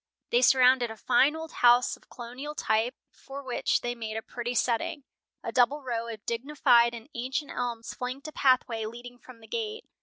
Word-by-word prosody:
They 240 Hz, -, +4 dB
surrounded 255 Hz, -1 st, +5 dB
a 220 Hz, -, -8 dB
fine 275 Hz, +7 st, +3 dB
old 320 Hz, 0 st, -7 dB
house 245 Hz, 0 st, +4 dB
of -, -, -25 dB
colonial 255 Hz, +5 st, -8 dB
type, 225 Hz, 0 st, 0 dB, 0.2 s
for 275 Hz, +1 st, -10 dB
which 255 Hz, -2 st, 0 dB
they 240 Hz, 0 st, -2 dB
made 220 Hz, -2 st, -5 dB
a 220 Hz, -, -5 dB
pretty 240 Hz, 0 st, -5 dB
setting. 280 Hz, +7 st, 0 dB, 0.4 s
A -, -, -4 dB
double 265 Hz, +4 st, +2 dB
row 235 Hz, -2 st, -3 dB
of 220 Hz, -3 st, -8 dB
dignified 235 Hz, -1 st, +3 dB
and 230 Hz, +1 st, -10 dB
ancient 265 Hz, +5 st, -3 dB
elms 235 Hz, -2 st, -4 dB
flanked 255 Hz, +4 st, -5 dB
a -, -, -7 dB
pathway 250 Hz, -5 st, +2 dB
leading 245 Hz, +2 st, -10 dB
from 245 Hz, -3 st, -15 dB
the 220 Hz, -, -14 dB
gate. 445 Hz, -1 st, -4 dB
245 Hz, 185 wpm, -28 LUFS, 235-270 Hz, 0.4 s, surrounded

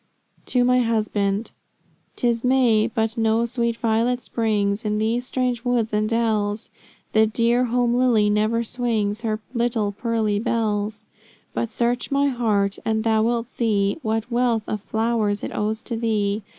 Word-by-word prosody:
TO 250 Hz, -1 st, +2 dB
MY 250 Hz, +1 st, +4 dB
HUSBAND. 215 Hz, -3 st, 0 dB, 0.6 s
"Tis 235 Hz, -1 st, 0 dB
May, 245 Hz, -4 st, +3 dB
but 225 Hz, -1 st, -2 dB
no 225 Hz, +1 st, +2 dB
sweet 235 Hz, -1 st, -1 dB
violet 235 Hz, +2 st, 0 dB
springs 210 Hz, -2 st, 0 dB
In 210 Hz, -1 st, -1 dB
these 230 Hz, +3 st, 0 dB
strange 250 Hz, -2 st, -1 dB
woods 240 Hz, -3 st, 0 dB
and 215 Hz, 0 st, +1 dB
dells; 220 Hz, -2 st, 0 dB, 0.4 s
The 220 Hz, 0 st, +4 dB
dear 235 Hz, +3 st, +2 dB
home 240 Hz, 0 st, +1 dB
lily 240 Hz, -4 st, +3 dB
never 215 Hz, +3 st, +1 dB
swings 225 Hz, -3 st, -1 dB
Her 215 Hz, -2 st, -2 dB
little 235 Hz, -4 st, 0 dB
pearly 215 Hz, -1 st, -1 dB
bells; 215 Hz, -1 st, -1 dB, 0.5 s
But 235 Hz, -, -2 dB
search 240 Hz, +1 st, -1 dB
my 280 Hz, 0 st, +2 dB
heart 210 Hz, -6 st, 0 dB
and 220 Hz, 0 st, 0 dB
thou 220 Hz, -1 st, +2 dB
wilt 235 Hz, +1 st, 0 dB
see 210 Hz, -2 st, 0 dB
What 225 Hz, +1 st, -2 dB
wealth 235 Hz, -2 st, +1 dB
of 215 Hz, -, -4 dB
flowers 220 Hz, -1 st, -1 dB
it -, -, -4 dB
owes 215 Hz, +1 st, -2 dB
to 235 Hz, -, -4 dB
thee. 215 Hz, -2 st, 0 dB
225 Hz, 150 wpm, -23 LUFS, 215-240 Hz, 0.6 s, MY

